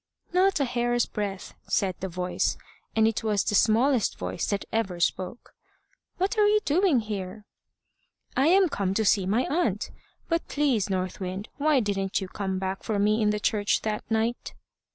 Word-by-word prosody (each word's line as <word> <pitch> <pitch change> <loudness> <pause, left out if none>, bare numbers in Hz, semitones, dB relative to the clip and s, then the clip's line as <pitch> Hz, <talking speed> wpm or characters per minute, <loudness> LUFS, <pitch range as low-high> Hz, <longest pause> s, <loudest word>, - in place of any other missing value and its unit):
"Not 375 -1 +3
a 280 - +2
hair's 240 -1 +1
breadth," 200 -3 -5
said 190 -2 +1
the 190 - -4
voice, 180 +1 -1 0.4
and 220 0 +4
it 225 -1 -1
was 210 -2 +1
the - - -1
smallest 230 +3 +3
voice 90 +1 -3
that 200 -1 -2
ever 195 -6 -1
spoke. 185 +6 -2 0.6
"What 395 +4 0
are 415 - +6
you 425 +1 +4
doing 315 -4 +3
here?" 205 -1 -6 0.9
"I 270 +4 +3
am 375 +2 +5
come 195 - -2
to 220 - +1
see 195 -2 +3
my 220 +6 +2
aunt. 255 - -1 0.4
But, 335 0 -1
please, 270 -9 +1
North 185 0 -2
Wind, 190 +2 -5
why 295 -2 +3
didn't 195 -2 -1
you 190 - -5
come 190 0 -3
back 190 0 -3
for 215 -3 -2
me 210 +2 +2
in 210 - +3
the 210 0 0
church 205 -1 +1
that 215 -1 -2
night?" 225 +2 -1
215 Hz, 175 wpm, -26 LUFS, 195-255 Hz, 0.9 s, are